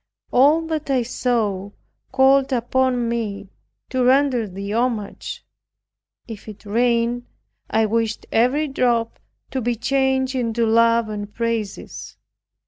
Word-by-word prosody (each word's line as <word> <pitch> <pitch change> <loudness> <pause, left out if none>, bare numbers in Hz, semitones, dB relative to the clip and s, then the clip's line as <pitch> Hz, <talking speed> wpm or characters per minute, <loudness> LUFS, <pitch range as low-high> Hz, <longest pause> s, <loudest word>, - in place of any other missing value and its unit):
All 295 +6 +4
that 315 -2 -3
I 260 -3 +2
saw 225 -5 -1 0.4
called 265 +1 +4
upon 250 0 +1
me 215 -4 -3 0.4
to 255 -1 +1
render 255 -3 +3
Thee 200 +2 -6
homage. 230 -3 -2 0.8
If 225 -3 -9
it 210 0 -12
rained, 235 +2 +1 0.4
I 220 0 +2
wished 225 +1 -1
every 260 +7 +2
drop 240 -4 0 0.3
to 260 - -2
be 240 +1 0
changed 265 +2 +1
into 235 -2 0
love 230 0 +3
and 205 -1 -5
praises. 230 -3 -4
235 Hz, 120 wpm, -21 LUFS, 220-260 Hz, 0.8 s, All